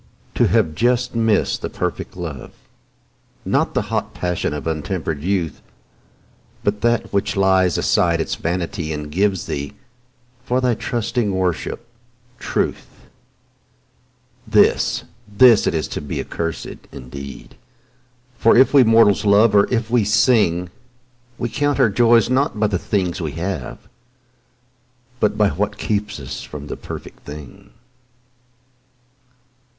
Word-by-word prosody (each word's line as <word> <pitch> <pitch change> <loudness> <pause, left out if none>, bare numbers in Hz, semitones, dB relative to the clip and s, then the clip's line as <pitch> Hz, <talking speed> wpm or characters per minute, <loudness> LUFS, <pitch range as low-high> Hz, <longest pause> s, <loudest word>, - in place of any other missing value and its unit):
To - - +3
have 80 - +2
just 120 +9 +1
missed 115 -3 +1
the - - -3
perfect - - -4
love, 80 -8 -7 0.9
Not - - 0
the - - +1
hot - - -2
passion 90 -2 -2
of 75 -2 -5
untempered 80 -1 -3
youth, 90 -4 -2 1.0
But 105 0 -1
that 120 -2 0
which 100 0 0
lays 95 -3 +3
aside 85 -1 +2
its 80 - -2
vanity 85 -1 -3
And 75 0 -6
gives 95 +2 0
thee, 70 -3 -4 0.7
for 125 0 0
thy 125 -1 +2
trusting 115 -1 -2
worship, 90 -2 -2 0.5
truth— - - -3 1.4
This, - - +3 0.3
this 115 +1 +6
it - - 0
is 80 - -1
to - - -4
be 75 - -5
accursed 80 -1 -5
indeed; 70 +2 -9 0.9
For 115 - +5
if 130 +3 +5
we 140 -2 +7
mortals 115 -3 +4
love, 105 +2 +5
or 100 -1 +4
if 115 -2 -1
we 120 -3 +3
sing, 100 -5 +2 0.7
We 120 - -2
count 145 +4 -1
our 130 -4 +5
joys 115 +2 +4
not 130 -3 0
by 110 - +3
the 100 -4 0
things 90 -4 -1
we 80 -3 -3
have, 85 -6 -4 1.4
But 105 - +1
by 105 -2 +4
what 105 +2 -2
kept 105 -4 -2
us 70 0 -6
from 75 -1 -8
the - - -5
perfect - - -9
thing. 75 -3 -11
100 Hz, 130 wpm, -20 LUFS, 80-115 Hz, 1.4 s, we